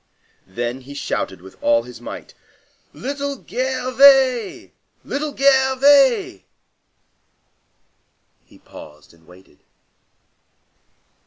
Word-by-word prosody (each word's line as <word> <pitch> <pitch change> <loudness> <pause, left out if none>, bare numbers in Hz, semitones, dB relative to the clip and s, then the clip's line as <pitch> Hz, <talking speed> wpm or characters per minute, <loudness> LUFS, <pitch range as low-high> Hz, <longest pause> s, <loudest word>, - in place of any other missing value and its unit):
Then 120 +6 -5
he 140 +2 -12
shouted 115 - -4
with 95 +1 -16
all 115 0 +2
his 120 -1 -13
might:— - - -10 0.6
"Little 280 +2 -5
Gervais! 260 -1 +2 0.3
Little 290 0 -4
Gervais!" 265 - +3 2.0
He - - -21
paused 75 +1 -15
and 80 -1 -26
waited. 90 +1 -20
250 Hz, 80 wpm, -19 LUFS, -, 2.0 s, Gervais